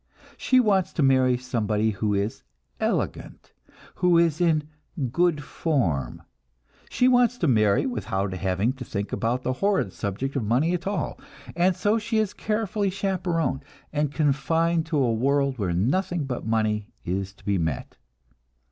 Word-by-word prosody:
She 255 - +3
wants 200 -6 +2
to 155 - +1
marry 130 -2 +4
somebody 110 -3 0
who 105 0 -1
is 100 +3 -2 0.4
"elegant," - - -3 0.4
who 180 -1 +3
is 165 -1 +2
in 155 -3 +2 0.4
"good 170 -1 +1
form"; 85 - -1 0.7
she 250 - +2
wants 245 -1 +4
to 170 - 0
marry 105 -6 +3
without 100 -5 -2
having 95 +6 0
to 130 -1 -8
think 100 -4 -4
about 125 +3 -1
the 130 - 0
horrid 195 - 0
subject 115 +7 -3
of 135 - 0
money 130 +11 +2
at 175 +1 -3
all, 200 +5 -2 0.4
and 180 +1 +3
so 215 +4 +1
she 220 +1 -2
is 215 -2 +1
carefully 210 -1 -1
chaperoned, 180 -8 -1 0.3
and 150 -1 0
confined 160 +3 +1
to 160 -2 -1
a 125 -5 +2
world 140 +2 +1
where 95 -4 0
nothing 150 - 0
but 125 -4 -4
money 110 -2 0 0.2
is 95 +2 -2
to 100 - -23
be 100 -2 +1
met. 80 -5 -3
135 Hz, 155 wpm, -25 LUFS, 110-175 Hz, 0.7 s, marry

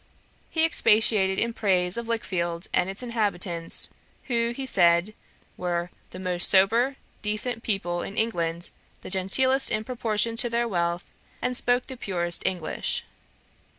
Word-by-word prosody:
He 320 -1 +2
expatiated 215 - +3
in 235 0 0
praise 185 -4 +1
of 235 -1 -4
Lichfield 175 -7 -2
and 180 - +2
its 195 +5 -2
inhabitants, 200 -8 +1 0.3
who, 235 -2 0
he 265 +3 -5
said, 175 -3 +3 0.4
were 175 0 -2 0.2
'the - - -10
most 180 -1 +3
sober, 230 +8 +4 0.3
decent 215 +3 -1
people 175 -6 -2
in 200 - -7
England, 170 -6 -1 0.3
the - - -9
genteelest 260 +9 +3
in 215 -1 -1
proportion 230 -2 0
to 240 +1 0
their 235 +1 0
wealth, 175 -3 -2 0.3
and 250 0 -2
spoke 245 +1 +1
the 260 - -9
purest 175 -6 -1
English.' 175 -4 -2
205 Hz, 140 wpm, -25 LUFS, 175-235 Hz, 0.4 s, sober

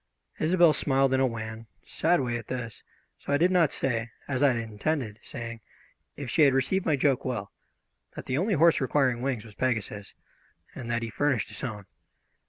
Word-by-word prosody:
Isobel 170 0 +5
smiled 135 -2 +2
in 130 - +3
a 135 - +4
wan, 110 -1 -6 0.2
sad 170 0 +1
way 120 -2 -1
at 115 -2 -6
this, 120 -4 -5 0.4
so - - -6
I 145 - +4
did 175 +4 +3
not 175 -5 +4
say, 115 -3 -1 0.2
as 135 -2 -1
I 145 - +6
had - - -2
intended 115 +1 -3
saying 115 -1 -7 0.5
if 140 - -6
she 140 +7 +1
had 140 -3 +6
received 185 +8 +1
my 155 - +4
joke 135 -2 +1
well, 120 -6 -3 0.6
that - - -7
the 130 +3 -1
only 200 +3 +1
horse 165 0 +4
requiring 130 -3 +1
wings 125 -4 -2
was 110 - -12
Pegasus, 105 -4 -2 0.6
and 120 -3 -7
that 120 0 -1
he 115 - -4
furnished 135 -2 0
his - - -7
own. 105 -6 -5
130 Hz, 190 wpm, -27 LUFS, 115-145 Hz, 0.6 s, I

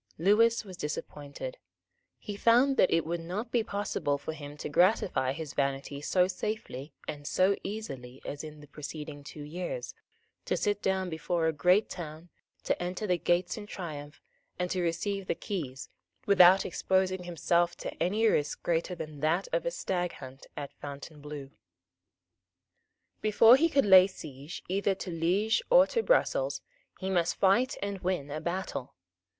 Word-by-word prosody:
Lewis 220 +6 +4
was 185 -3 -10
disappointed. 150 - -6 0.6
He 205 - -7
found 245 +6 +4
that - - +5
it 165 -1 +2
would 170 +1 -2
not 195 +8 -5
be 240 - +3
possible 200 -9 -1
for 160 - -5
him 145 -1 -9
to - - -5
gratify 175 - +3
his 155 +1 -6
vanity 140 0 -2
so 180 +4 +3
safely 185 -9 -4 0.2
and 145 -1 -6
so 190 +2 +3
easily 135 - -6
as 145 - -5
in 150 -1 -9
the - - -12
two 145 - -29
preceding 150 -1 -7
years, 170 - -5 0.5
to - - 0
sit 205 -1 0
down 190 -1 0
before 160 +1 -1
a 160 - +2
great 180 +7 +3
town, 165 -1 -8 0.3
to - - -1
enter 180 +4 -3
the 180 -3 +1
gates 175 +3 +1
in 205 -1 -7
triumph, 150 -6 -7 0.3
and 180 0 -2
to 185 - 0
receive 185 +3 -2
the - - 0
keys, 145 -12 -5 0.4
without 190 -1 +7
exposing 185 0 0
himself 175 0 +1
to - - -5
any 210 +6 +2
risk 150 -9 +1
greater 170 +2 0
than 155 -3 -7
that 160 +6 +1
of - - 0
a - - +3
staghunt 175 - -4
at 140 -1 -6
Fontainebleau. 145 -1 -8 1.7
Before 225 +2 +7
he 330 +5 +3
could 275 -5 +3
lay 190 -2 +8
siege 150 -4 -9
either 195 +1 +1
to 185 - -6
Liege 185 - +1
or - - +8
to 460 - 0
Brussels - - +1 0.4
he 190 0 -2
must 175 -2 +1
fight 205 +7 +3
and 200 -1 -3
win 175 -6 -2
a 155 +1 -4
battle. 170 -8 -4
175 Hz, 160 wpm, -30 LUFS, 150-200 Hz, 1.7 s, lay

